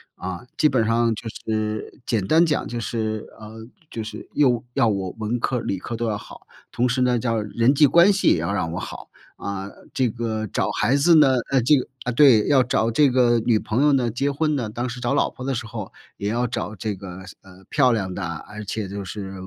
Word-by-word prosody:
啊， 95 +5 -6
基 155 - +4
本 120 -5 +1
上 115 0 +2
就 115 - -8
是 110 0 -4
简 110 -5 0
单 165 - +5
讲 150 - -1
就 120 0 -4
是， 110 -1 -3
呃， 110 +1 -10 0.2
就 115 - -5
是 110 - -9
又 125 -6 +2
要 115 - +3
我 95 -3 -1
文 110 +2 -2
科 130 - -1
儿 - - -2
理 100 - -2
科 115 - -5
儿 - - -5
都 115 0 -2
要 105 - 0
好， - - -13 0.3
同 125 +1 +1
时 130 +1 0
呢， 125 -1 +3
叫 115 -1 -1
人 115 +5 +2
际 145 0 +5
关 175 +7 +6
系 195 - 0
也 - - +5
要 85 +5 -2
让 80 -5 -1
我 90 - -4
好。 - - -8 0.3
啊， 100 -1 -5 0.3
这 130 -2 +1
个 110 -1 -3
找 95 0 -1
孩 105 +6 +1
子 165 +4 +5
呢， 145 -4 +6 0.2
呃 135 - +3
这 150 +5 +5
个 130 - -3 0.2
呃， 125 - -1
对， 120 -5 +6
要 140 -3 +5
找 115 -2 0
这 140 +4 +4
个 120 -2 +3
女 110 0 +2
朋 115 +6 0
友 150 - +5
呢， 125 -3 +2
结 140 +5 -1
婚 155 +1 0
呢， 120 -6 -2
当 120 +4 -3
时 125 +1 -7
找 120 - 0
老 - - +2
婆 125 - -10
的 135 - -1
时 120 -1 -4
候， 110 -3 -7 0.3
也 100 +1 -2
要 120 +2 0
找 110 -2 -4
这 105 +1 -3
个， 95 -2 -9 0.2
呃， 95 0 -17
漂 130 -4 +3
亮 95 -5 -1
的， 95 - -5
而 85 +6 -6
且 105 0 -4
就 100 +1 -6
是 95 0 -7
115 Hz, 255 characters per minute, -23 LUFS, 105-125 Hz, 0.3 s, 关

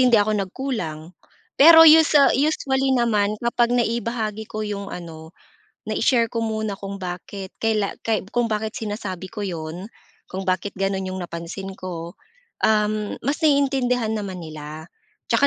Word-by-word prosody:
hindi 250 -2 +5
ako 210 0 +3
nagkulang. 195 - -4 0.5
Pero 325 +2 +10
us 320 0 +7 0.2
usually 270 -2 +1
naman, 215 -3 +1
kapag 235 0 +1
naibahagi 230 -2 -1
ko 215 0 -4
'yong, 200 -1 -4
ano, 160 -2 -9 0.5
nai-share 235 -3 +2
ko 230 - -3
muna 220 -2 -2
kung 200 0 -6
bakit 185 +2 -6
kaila 215 -3 0
kay 220 -2 +1
kung 240 0 +1
bakit 215 0 -2
sinasabi 205 -4 -5
ko - - -7
'yon, 175 0 -5 0.4
kung 190 +1 -5
bakit 185 +2 0
gano'n 195 -1 -1
'yong 185 - -5
napansin 175 +3 -6
ko, 170 -2 -6 0.5
uhm, 210 -1 +1
mas 280 +4 -2
naiintindihan 265 -6 +2
naman 200 -4 -4
nila. 155 0 -8 0.4
Tsaka 280 - +4
210 Hz, 140 wpm, -22 LUFS, 185-235 Hz, 0.5 s, Pero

